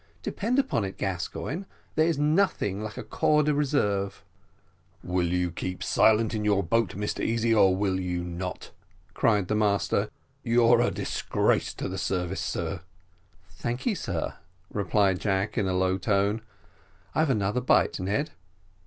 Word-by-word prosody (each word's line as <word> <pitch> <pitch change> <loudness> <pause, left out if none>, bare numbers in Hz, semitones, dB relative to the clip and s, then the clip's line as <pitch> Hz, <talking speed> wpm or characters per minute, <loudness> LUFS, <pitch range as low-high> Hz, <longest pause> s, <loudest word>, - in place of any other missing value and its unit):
Depend 235 +5 -1
upon 265 - +1
it, 95 0 -5
Gascoigne, 100 - -3 0.3
there 155 +1 +3
is 165 -4 +1
nothing 150 - +1
like 110 -1 -6
a - - -4
corps 150 0 +2
de 150 0 +2
reserve." 105 -10 0 0.8
"Will 90 -1 0
you 90 0 0
keep 90 +2 -4
silence 110 0 +3
in 110 -1 -2
your 100 -2 +2
boat, 105 +1 +1
Mr 105 +1 -3
Easy, 115 0 +1
or 95 -4 +5
will 95 -1 0
you 90 -1 -2
not?" 90 +1 -5 0.4
cried 105 -4 +2
the - - 0
master; 105 -2 +1 0.3
"you're 120 0 +4
a - - +3
disgrace - - 0
to - - -4
the 95 +1 -4
service, 90 0 -2
sir." 85 +1 -3 0.7
"Thank 120 +8 -5
ye, 240 - +2
sir," 95 - -3 0.4
replied 100 -1 +2
Jack, 95 0 0
in 105 -5 +1
a 95 - 0
low 95 +1 +1
tone. 100 +1 +1 0.7
"I've 155 -1 +2
another 105 -1 +1
bite, 125 - +3
Ned." 100 - -1
100 Hz, 155 wpm, -27 LUFS, 95-120 Hz, 0.8 s, or